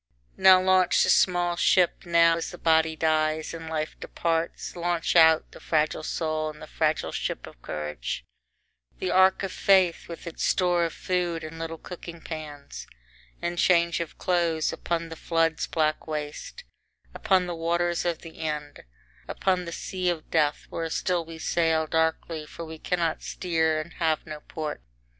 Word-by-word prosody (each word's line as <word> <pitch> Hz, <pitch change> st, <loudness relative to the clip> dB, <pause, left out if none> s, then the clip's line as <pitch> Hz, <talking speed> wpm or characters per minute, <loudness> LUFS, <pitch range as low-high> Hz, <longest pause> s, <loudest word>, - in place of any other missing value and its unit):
Now 185 Hz, -1 st, +7 dB
launch 185 Hz, -1 st, +4 dB
the -, -, +3 dB
small 175 Hz, -1 st, +3 dB
ship, 180 Hz, +1 st, +2 dB
now 170 Hz, -1 st, +5 dB
as 165 Hz, -, -3 dB
the 175 Hz, -, -9 dB
body 160 Hz, -1 st, +3 dB
dies 155 Hz, 0 st, 0 dB
and 165 Hz, -1 st, -7 dB
life 155 Hz, -1 st, -3 dB
departs, 165 Hz, 0 st, -2 dB
launch 175 Hz, -1 st, -1 dB
out, 160 Hz, -1 st, +6 dB
the -, -, -12 dB
fragile 155 Hz, -1 st, 0 dB
soul 155 Hz, -1 st, -2 dB
in 150 Hz, 0 st, -10 dB
the -, -, -8 dB
fragile 155 Hz, 0 st, 0 dB
ship -, -, -3 dB
of -, -, -14 dB
courage, 75 Hz, -5 st, -5 dB, 0.7 s
the 185 Hz, -, -2 dB
ark 190 Hz, +1 st, +4 dB
of 195 Hz, -, -2 dB
faith 185 Hz, -3 st, +3 dB
with 170 Hz, -, -9 dB
its 170 Hz, -, -5 dB
store 175 Hz, -2 st, +2 dB
of 165 Hz, -, -4 dB
food 175 Hz, -3 st, -1 dB
and 160 Hz, +1 st, -8 dB
little 165 Hz, 0 st, -5 dB
cooking 170 Hz, 0 st, -9 dB
pans 155 Hz, -3 st, -8 dB, 0.6 s
and 175 Hz, 0 st, -2 dB
change 170 Hz, -2 st, +3 dB
of 170 Hz, -2 st, -5 dB
clothes, 170 Hz, -3 st, +1 dB
upon 170 Hz, -1 st, -3 dB
the 165 Hz, -, -7 dB
flood's 165 Hz, -1 st, 0 dB
black 155 Hz, -1 st, 0 dB
waste 150 Hz, -, -5 dB, 0.5 s
upon 185 Hz, -2 st, +2 dB
the 175 Hz, -, -4 dB
waters 170 Hz, +1 st, 0 dB
of 170 Hz, -2 st, -2 dB
the 165 Hz, -1 st, -11 dB
end 150 Hz, -2 st, -4 dB, 0.4 s
upon 185 Hz, -2 st, 0 dB
the 170 Hz, -, -6 dB
sea 185 Hz, +1 st, -2 dB
of 165 Hz, -3 st, -4 dB
death, 150 Hz, -2 st, +1 dB
where 165 Hz, -1 st, -3 dB
still 175 Hz, +1 st, 0 dB
we 165 Hz, 0 st, -10 dB
sail 160 Hz, -1 st, +1 dB
darkly, 160 Hz, 0 st, -1 dB
for 165 Hz, -, -8 dB
we 160 Hz, 0 st, -9 dB
cannot 170 Hz, -2 st, -1 dB
steer, 160 Hz, -3 st, 0 dB
and 155 Hz, +2 st, -7 dB
have 160 Hz, -2 st, 0 dB
no 155 Hz, -1 st, -7 dB
port. 150 Hz, 0 st, -6 dB
165 Hz, 165 wpm, -26 LUFS, 155-175 Hz, 0.7 s, Now